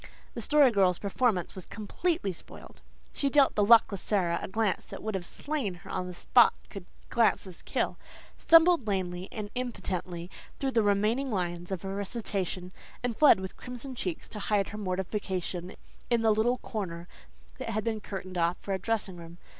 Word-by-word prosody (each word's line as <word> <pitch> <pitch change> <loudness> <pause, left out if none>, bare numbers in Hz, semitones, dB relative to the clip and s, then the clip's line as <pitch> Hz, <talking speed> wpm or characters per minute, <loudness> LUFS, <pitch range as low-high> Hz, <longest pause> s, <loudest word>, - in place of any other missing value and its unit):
The - - -5
Story 290 -4 +5
Girl's 190 -4 +3
performance 200 -2 0
was 185 - -9
completely 225 - -2
spoiled. - - -13 0.3
She 280 - +1
dealt 280 0 +5
the 210 - +2
luckless 205 -3 +5
Sara 175 -5 +1
a - - -4
glance 215 0 0
that - - -9
would 220 0 -2
have 180 -3 -2
slain 280 -11 -3
her 175 - -11
on 185 -1 -2
the 180 - -6
spot 240 +7 +5 0.2
could 195 -3 -8 0.2
glances 215 -6 +1
kill, - - -2 0.4
stumbled 330 -6 +5
lamely 185 -2 -2
and 210 -2 -6
impotently 185 -8 -4 0.3
through 270 -1 0
the 230 - +3
few 205 - +1
remaining 215 +7 +2
lines 175 -3 -2
of 190 -3 -3
her 195 0 -4
recitation, 195 -3 -3 0.3
and 245 -2 -1
fled 295 -8 +7
with 190 0 -6
crimson 250 +2 -7
cheeks 185 -8 -4
to 210 - -7
hide 205 -1 +1
her 210 - -7
mortification 185 -1 -3 0.3
in 235 -2 +2
the 220 - +5
little 235 +4 +2
corner 175 -8 -5 0.5
that - - -4
had 215 -1 -1
been 220 -2 -2
curtained 185 -3 -5
off 170 +1 +2
for 195 - -4
a 190 - -1
dressing 195 -2 -2
room. 170 0 -11
200 Hz, 180 wpm, -29 LUFS, 185-230 Hz, 0.5 s, fled